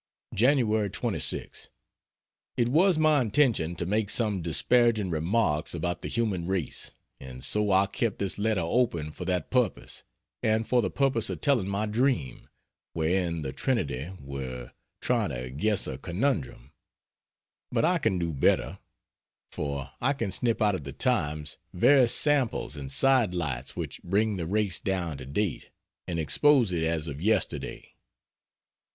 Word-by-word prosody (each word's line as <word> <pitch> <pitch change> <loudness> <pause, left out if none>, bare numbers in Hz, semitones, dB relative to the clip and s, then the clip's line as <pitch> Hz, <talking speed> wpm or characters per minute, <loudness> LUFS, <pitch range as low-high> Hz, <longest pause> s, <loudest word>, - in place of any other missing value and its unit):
Jan. 130 +7 +4
26. 110 -4 -1 0.9
It 120 -1 +2
was 170 +5 +4
my 155 -2 +4
intention 110 - +1
to 85 - -3
make 105 +3 0
some 105 -4 +2
disparaging 110 +4 +2
remarks 80 -1 0
about 85 0 -2
the - - -4
human 105 -7 -1
race; 95 -6 -2 0.3
and 65 -1 -10
so 105 -1 0
I 95 +1 +4
kept 110 +1 -2
this 100 0 -2
letter 105 -4 +1
open 85 -6 0
for - - -7
that 90 -3 -2
purpose, 125 -7 -1 0.4
and 110 0 +1
for 125 -1 +3
the - - -1
purpose 135 0 0
of - - -4
telling 125 -10 +1
my 100 +2 -1
dream, 115 - -1 0.4
wherein 85 0 -1
the 65 -1 -5
Trinity 85 - -2
were 65 -3 -7 0.3
trying - - +1
to 65 0 -5
guess 105 +9 +1
a 65 - -5
conundrum, 85 - -2 1.0
but - - +1
I 175 +1 +2
can 110 - 0
do 85 -2 -2
better 70 - +1 0.7
for 70 -2 -4
I 130 +4 +2
can 115 -8 -3
snip 115 +1 +1
out 105 -1 +3
of 90 - -4
the 70 - -7
"Times" 75 - -1 0.2
various 125 +5 +5
samples 145 - +1
and 70 -2 -4
side 130 - +3
lights 70 -7 -2
which - - -5
bring 105 +3 0
the 85 -3 -4
race 100 -2 +1
down 85 -7 -2
to 65 - -9
date, 95 +6 -2 0.4
and 85 -1 -2
expose 110 - +3
it 85 -2 -1
as 80 -1 0
of 70 0 -6
yesterday. 110 +4 -1
95 Hz, 150 wpm, -27 LUFS, 80-115 Hz, 1.0 s, various